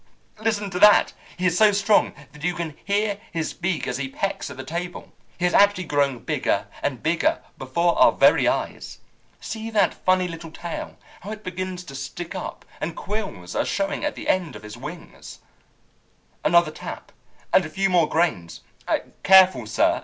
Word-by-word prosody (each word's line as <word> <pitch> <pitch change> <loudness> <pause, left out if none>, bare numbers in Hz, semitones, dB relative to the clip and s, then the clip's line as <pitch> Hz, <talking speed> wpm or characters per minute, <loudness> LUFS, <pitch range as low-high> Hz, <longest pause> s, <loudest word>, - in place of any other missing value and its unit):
Listen 210 -2 -1
to 180 - -3
that! 210 +1 +6 0.2
He 180 - -2
is 180 -2 +3
so 215 +1 +6
strong 205 +1 +2 0.2
that 150 0 -13
you 180 +1 0
can 165 -4 -4
hear 205 0 0
his 165 -2 -3
beak 175 -2 -2
as 125 - -2
he 135 -1 -3
pecks 195 +9 -3
at - - -9
the 130 - -6
table. 170 +5 -6 0.2
He 180 - 0
is 180 - +1
actually 200 -2 +5
growing 140 -6 0
bigger - - 0 0.2
and 130 -5 -2
bigger 160 +2 +1 0.2
before 170 +6 +1
our - - +7
very - - +4
eyes! - - -2 0.4
See 225 0 -5
that 205 -4 +2
funny 185 0 +1
little 165 -1 -8
tail, 170 +1 -7 0.2
how 200 - -9
it 215 0 -7
begins 185 0 -5
to 150 - -11
stick 140 +6 -6
up, 185 - -6
and 160 +1 -4
quills 170 - -5
are - - +2
showing 195 +6 -2
at 295 - -1
the - - -7
end 180 -5 0
of - - -10
his 105 +1 -8
wings. 150 +8 -10 1.1
"Another 170 -1 +4
tap, - - -8 0.4
and 190 - +6
a 155 - -6
few 195 +4 0
more 175 -5 +3
grains. 155 - -1 0.6
Careful, 185 - +6
sir! 110 - +2
175 Hz, 180 wpm, -23 LUFS, 155-195 Hz, 1.1 s, our